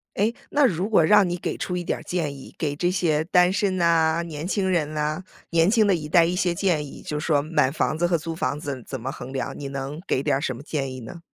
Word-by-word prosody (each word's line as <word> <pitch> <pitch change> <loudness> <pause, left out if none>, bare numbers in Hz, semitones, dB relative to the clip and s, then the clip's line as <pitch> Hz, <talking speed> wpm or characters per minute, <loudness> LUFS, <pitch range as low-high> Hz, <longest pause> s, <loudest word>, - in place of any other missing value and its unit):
诶， 210 +3 +2 0.2
那 290 0 +3
如 190 -5 +1
果 210 -7 +4
让 205 +2 +5
你 175 - -1
给 175 - -3
出 180 - -3
一 180 - -2
点 - - -2
儿 - - -11
建 165 -5 -2
议， 135 - -12
给 145 -3 -2
这 175 +4 +1
些 160 -4 +1
单 180 +1 +4
身 200 -2 0
呐、 165 -1 +3
年 155 -1 -6
轻 195 0 0
人 155 -4 0
呐、 150 +3 -1 0.3
年 165 0 +4
轻 220 0 +4
的 195 - +4
一 150 -2 -6
代 170 +1 +5
一 175 +2 0
些 180 -2 +1
建 175 -5 0
议， 135 - -11
就 150 - -3
说 150 -2 +1
买 155 -3 +2
房 155 +1 -1
子 175 - +2
和 175 0 +2
租 165 +1 -5
房 150 -3 -2
子 140 -3 -4
怎 135 - -5
么 130 +4 -3
衡 130 0 -8
量， 135 - -4
你 140 - -5
能 140 +2 -5
给 130 - 0
点 140 -2 +1
儿 - - -1
什 135 -3 -2
么 130 - -10
建 140 -3 -3
议 130 - -7
呢？ 125 +9 -9
160 Hz, 290 characters per minute, -24 LUFS, 145-180 Hz, 0.3 s, 让